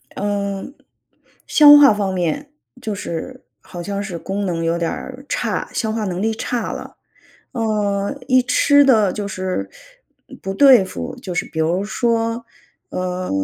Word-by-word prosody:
嗯， 200 +3 -3 0.7
消 295 -1 +8
化 280 -7 +7
方 200 -2 -2
面 185 - -2 0.3
就 220 -4 -3
是 200 +7 -6 0.2
好 175 - -9
像 200 +3 -3
是 195 -4 -5
功 195 +4 -3
能 170 -3 -2
有 165 +1 0
点 170 -1 -1
儿 265 +1 -8
差， - - -2
消 220 -2 -1
化 220 -1 -2
能 185 0 -3
力 220 +1 0
差 235 +2 -3
了， - - -8 0.6
呃， 210 -1 -1
一 255 -1 +5
吃 285 +3 +4
得 220 -8 +4
就 205 0 -4
是 185 - -3 0.7
不 195 0 -4
对 260 -3 +7
付 185 - -6
就 190 -8 -7
是 - - -1
比 160 - -7
如 170 +5 +1
说， 230 +1 -1 0.4
呃， 185 0 -3
205 Hz, 165 characters per minute, -19 LUFS, 185-235 Hz, 0.7 s, 消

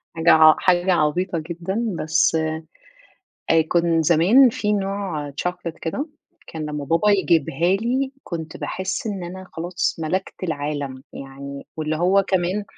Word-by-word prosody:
حاجة 165 +1 +4
ع 155 -1 +7
حاجة 180 0 +3
عبيطة 170 +2 0
جدًا، 190 +5 -3
بس 155 +1 +2 1.2
آآ، 165 0 +5
كن 170 -1 +2
زمان 185 - +5
في 210 -1 -1
نوع 195 -7 -2
chocolate 170 +2 -4
كده، 275 - -2 0.4
كان 160 -1 -7
لمَّا 150 -1 -4
بابا 165 +8 +2
يجيبها 170 -2 +2
لي، 255 +5 -1
كنت 160 -3 -6
باحس 190 +3 -4
إن 195 -4 -3
أنا 185 +2 -8
خلاص 175 +2 -2
ملَكت 185 +4 -2
العالَم. 145 -4 -4
يعني، 140 +1 -9
واللي 155 0 -2
هو 185 +4 +3
كمان 190 +2 0
170 Hz, 135 wpm, -22 LUFS, 155-190 Hz, 1.2 s, ع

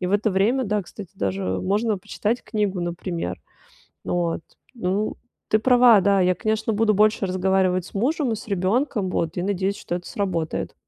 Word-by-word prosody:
И 180 - -1
в 190 - -2
это 205 +1 +2
время, 225 +8 +2
да, 210 0 0
кстати, 190 +1 -10
даже 95 -1 -2 0.2
можно 210 +2 +1
почитать 210 +4 -2
книгу, 205 -4 -1
например. 170 - -4 0.6
Вот, 170 -2 -1 0.3
ну, 205 -1 -1 0.3
ты 215 - +3
права, 245 -3 +6
да, 200 0 +3
я, 180 0 +3
конечно, 220 0 -1
буду 215 0 +3
больше 210 0 +3
разговаривать 185 -1 +1
с - - -13
мужем 260 +4 0
и - - -1
с 215 - -10
ребенком, 205 +2 0
вот, 165 -1 -2
и, - - 0
надеюсь, 195 +1 -1
что 175 - -4
это 175 0 -6
сработает. 175 -6 -2
200 Hz, 175 wpm, -23 LUFS, 180-215 Hz, 0.6 s, права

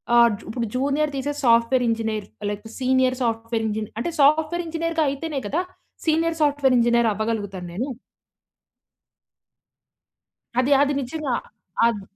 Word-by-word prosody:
ఆహ్, 235 0 +7
జు - - -15
ఇప్పుడు 230 0 -2
జూనియర్ 285 +3 +1
తీసేసి 285 +2 -3
సాఫ్ట్‌వేర్ 235 +2 +4
ఇంజనీర్ 220 -2 -1 0.2
లేపోతే 205 +2 -6
సీనియర్ 255 0 +2
సాఫ్ట్‌వేర్ 230 0 -1
ఇంజనీర్ 215 0 -3
అంటే 340 - -2
సాఫ్ట్‌వేర్ 315 +4 +3
ఇంజనీర్‌గా 330 0 -1
అయితేనే 280 +1 -3
కదా! 325 - 0 0.4
సీనియర్ 325 +1 +1
సాఫ్ట్‌వేర్ 285 -3 +3
ఇంజనీర్ 235 -1 +3
అవ్వగలుగుతాను 205 -4 -3
నేనూ. 250 +9 -3 2.7
అది, 255 +3 +2
అది 290 0 +2
నిజంగా 275 0 -3 0.5
అద్ 220 -3 -1
255 Hz, 125 wpm, -23 LUFS, 230-295 Hz, 2.7 s, ఆహ్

